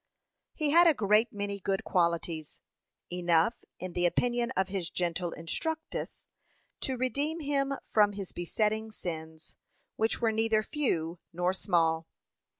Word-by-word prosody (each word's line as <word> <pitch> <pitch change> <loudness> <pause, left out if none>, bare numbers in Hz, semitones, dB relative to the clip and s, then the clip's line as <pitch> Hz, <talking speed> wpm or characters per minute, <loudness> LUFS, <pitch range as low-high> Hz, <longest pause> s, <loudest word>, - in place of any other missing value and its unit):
He 305 -3 +1
had 340 +2 +7
a 320 - +5
great 215 +2 +3
many 200 -1 -3
good 195 0 -1
qualities 170 -3 0 0.5
enough, 175 +3 +2
in 185 -1 -6
the 175 0 +3
opinion 240 +5 +1
of 190 - +2
his 185 -3 -2
gentle 175 0 -1
instructress, 320 - -4 0.5
to 265 -2 -2
redeem 285 +6 0
him 280 -2 0
from 205 -1 +4
his 195 -2 -6
besetting 215 +5 -1
sins, 160 -5 -7 0.4
which 220 +1 +1
were 230 -2 +2
neither 220 0 +2
few 175 - -1
nor 180 +2 0
small. 165 -4 +1
200 Hz, 135 wpm, -30 LUFS, 175-240 Hz, 0.5 s, had